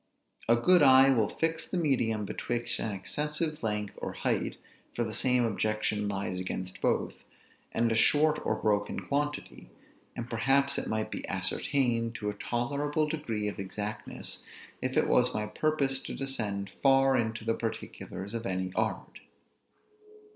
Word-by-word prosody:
A 115 Hz, -, +7 dB
good 175 Hz, +9 st, +5 dB
eye 135 Hz, -1 st, +8 dB
will 110 Hz, -5 st, +2 dB
fix 165 Hz, 0 st, -1 dB
the 185 Hz, -, -2 dB
medium 120 Hz, -9 st, +1 dB
betwixt 120 Hz, +3 st, -2 dB
an 110 Hz, -, -2 dB
excessive 150 Hz, -, -2 dB
length 105 Hz, -2 st, -1 dB
or -, -, -3 dB
height -, -, -1 dB, 0.4 s
(for 120 Hz, -, +1 dB
the 110 Hz, -1 st, -4 dB
same 125 Hz, 0 st, +2 dB
objection 105 Hz, -1 st, 0 dB
lies 95 Hz, -2 st, -2 dB
against 90 Hz, 0 st, -5 dB
both), -, -, 0 dB, 0.5 s
and 115 Hz, 0 st, +1 dB
a -, -, +2 dB
short 150 Hz, +6 st, +4 dB
or -, -, +1 dB
broken 105 Hz, -1 st, 0 dB
quantity: 145 Hz, +1 st, -3 dB, 0.5 s
and 120 Hz, -, -5 dB
perhaps 135 Hz, +4 st, +2 dB
it -, -, -5 dB
might 110 Hz, 0 st, -1 dB
be -, -, -4 dB
ascertained 120 Hz, -4 st, 0 dB
to 105 Hz, -1 st, -2 dB
a -, -, -9 dB
tolerable 140 Hz, +8 st, -1 dB
degree 115 Hz, -9 st, -2 dB
of 105 Hz, -, -4 dB
exactness, 105 Hz, +2 st, -4 dB, 0.4 s
if -, -, -1 dB
it -, -, +4 dB
was -, -, +3 dB
my 105 Hz, 0 st, 0 dB
purpose 135 Hz, +4 st, 0 dB
to -, -, -6 dB
descend 105 Hz, -8 st, -2 dB
far 135 Hz, -1 st, +5 dB
into 110 Hz, -2 st, -1 dB
the 115 Hz, -, +2 dB
particulars 110 Hz, -3 st, -5 dB
of 115 Hz, 0 st, -3 dB
any 95 Hz, -1 st, -2 dB
art. -, -, -2 dB
115 Hz, 155 wpm, -30 LUFS, 105-140 Hz, 0.5 s, eye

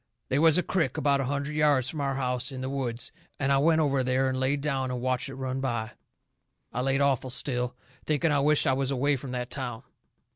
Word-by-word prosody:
They 135 Hz, -, +2 dB
was 160 Hz, 0 st, +6 dB
a 180 Hz, -, +2 dB
crick 165 Hz, -9 st, 0 dB
about 140 Hz, -1 st, +2 dB
a -, -, -1 dB
hundred 140 Hz, +2 st, -2 dB
yards 145 Hz, -4 st, +3 dB
from 150 Hz, +2 st, -3 dB
our 135 Hz, -1 st, -1 dB
house, 125 Hz, 0 st, -1 dB
in 130 Hz, -1 st, -6 dB
the 130 Hz, +1 st, -3 dB
woods, 125 Hz, -3 st, -3 dB, 0.3 s
and 135 Hz, 0 st, +1 dB
I 135 Hz, -, +4 dB
went 160 Hz, +2 st, +4 dB
over 140 Hz, -3 st, +2 dB
there 130 Hz, +1 st, +1 dB
and 130 Hz, 0 st, -2 dB
laid 135 Hz, +2 st, +1 dB
down 135 Hz, -3 st, -1 dB
and 125 Hz, -1 st, -3 dB
watched 130 Hz, +1 st, -1 dB
it 135 Hz, -, -7 dB
run 130 Hz, 0 st, -3 dB
by. 120 Hz, -4 st, -2 dB, 0.8 s
I 125 Hz, -, -1 dB
laid 135 Hz, +1 st, +1 dB
awful 135 Hz, -2 st, +1 dB
still, 125 Hz, -1 st, -2 dB, 0.3 s
thinking 155 Hz, +1 st, +2 dB
I 145 Hz, -, +3 dB
wisht 150 Hz, +2 st, +3 dB
I 135 Hz, -, +3 dB
was 135 Hz, 0 st, 0 dB
away 140 Hz, +2 st, +2 dB
from 135 Hz, 0 st, -7 dB
that 125 Hz, 0 st, -4 dB
town. 125 Hz, -3 st, -4 dB
135 Hz, 230 wpm, -28 LUFS, 130-140 Hz, 0.8 s, was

